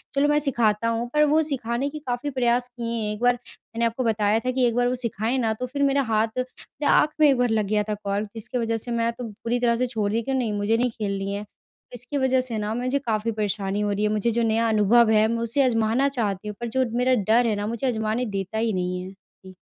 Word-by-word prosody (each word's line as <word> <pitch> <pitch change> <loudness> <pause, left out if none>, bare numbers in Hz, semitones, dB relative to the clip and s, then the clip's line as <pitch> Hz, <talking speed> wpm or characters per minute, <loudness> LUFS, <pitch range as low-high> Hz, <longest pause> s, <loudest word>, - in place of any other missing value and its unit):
चलो 280 +1 +3
मैं 295 - +3
सिखाता 230 -6 +1
हूँ 230 +1 -1
पर 300 0 +4
वो 305 +2 +3
सिखाने 265 -2 -2
के 305 +1 -7
काफ़ी 255 -1 -3
प्रयास 245 -2 +1
किए 240 -2 -5
हैं। 210 -1 -2
एक 210 - -8
बार 245 0 +4
मैंने 235 -1 -6
आपको 230 +3 -1
बताया 215 -1 +2
था 255 - +1
कि 255 0 +1
एक 235 - -1
बार 245 0 +2
वो 250 - 0
सिखाएँ 235 0 -1
ना 225 -4 +1
तो 250 - -2
फिर 280 +3 -2
मेरा 280 0 +3
हाथ 220 +1 +3
मेरे 255 +3 -6
आँख - - +4
में 305 - +7
एक 270 - +3
बार 245 0 +2
लग 220 -2 +1
गया 210 +1 +1
था - - +1
कॉर्क 200 +1 -2
जिसके 225 +3 -3
वज़ह 230 -1 0
से 240 +2 -6
मैं 230 0 +1
तो 245 - -8
पूरी 230 +3 -3
तरह 235 -1 +2
से 250 +2 0
छोड़ 215 -4 -2
दी 225 +2 0
कि 270 +4 -3
नहीं 245 -5 0
मुझे 205 +2 +1
नहीं 245 +1 +1
खेलनी 200 -2 -3
है। 205 +1 -4
तो 210 - -19
इसकी 250 +4 -4
वज़ह 260 -1 +2
से 245 -3 -2
न 215 +2 -2
मुझे 255 +3 0
काफ़ी 230 -3 -1
परेशानी 205 -2 -2
हो 205 0 0
रही 205 +1 -1
है 210 - +2
मुझे 215 +2 +1
जो 235 +1 0
नया 225 +1 +2
अनुभव 220 +2 +4
है 215 0 +4
मैं 230 +1 -1
उसे 235 +5 +1
अजमाना 230 +1 +2
चाहती 205 -3 -2
हूँ 210 - -5
पर 235 - -2
जो 260 - +3
मेरा 255 +1 +3 0.2
डर 240 +1 +4
है 215 - +1
न - - -2
मुझे 235 +3 -2
आज़माने 220 0 -1
देता 200 -1 -4
ही 225 0 0
नहीं 180 -1 -2
है। 185 +1 -8
जी। 190 -1 -18
230 Hz, 265 wpm, -24 LUFS, 215-250 Hz, 0.2 s, में